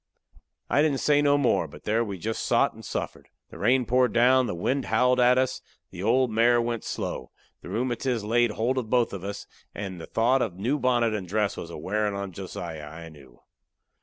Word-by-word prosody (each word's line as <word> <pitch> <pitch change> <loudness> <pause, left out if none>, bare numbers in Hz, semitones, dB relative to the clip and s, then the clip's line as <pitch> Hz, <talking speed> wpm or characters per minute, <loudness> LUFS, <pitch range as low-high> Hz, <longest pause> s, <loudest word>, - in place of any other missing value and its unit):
I 145 - +3
didn't 150 -3 +2
say 145 +1 +3
no 145 0 +4
more, 140 - +2
but 70 - -14
there 110 +2 +1
we 100 -4 -5
jest 110 +5 -3
sot - - +2
and - - -13
suffered. - - -5 0.2
The - - -11
rain 125 +4 +3
poured 125 +1 +2
down; 125 +1 +4
the 105 - -3
wind 130 +10 -1
howled 125 0 +2
at 125 +1 +5
us; 130 0 0 0.3
the 90 - -8
old 120 +4 +2
mare 120 +2 +4
went 115 -1 -2
slow; - - -4 0.3
the - - -10
rheumatiz 120 -1 -1
laid 120 +2 +2
holt 125 +5 0
of 115 -4 -6
both 120 -3 +2
of 95 -2 -6
us; 100 +1 -6 0.3
and 95 -4 -6
the - - -9
thought 125 +4 +2
of 100 -8 -2
the 95 - -11
new 140 +6 +1
bonnet 120 -3 +2
and 100 -4 -4
dress 105 +2 0
was 85 - -7
a - - -7
wearin' 105 +5 -1
on 100 -1 -4
Josiah, 85 -4 -7
I 80 +2 -10
knew. 70 -6 -17
115 Hz, 215 wpm, -26 LUFS, 100-125 Hz, 0.3 s, at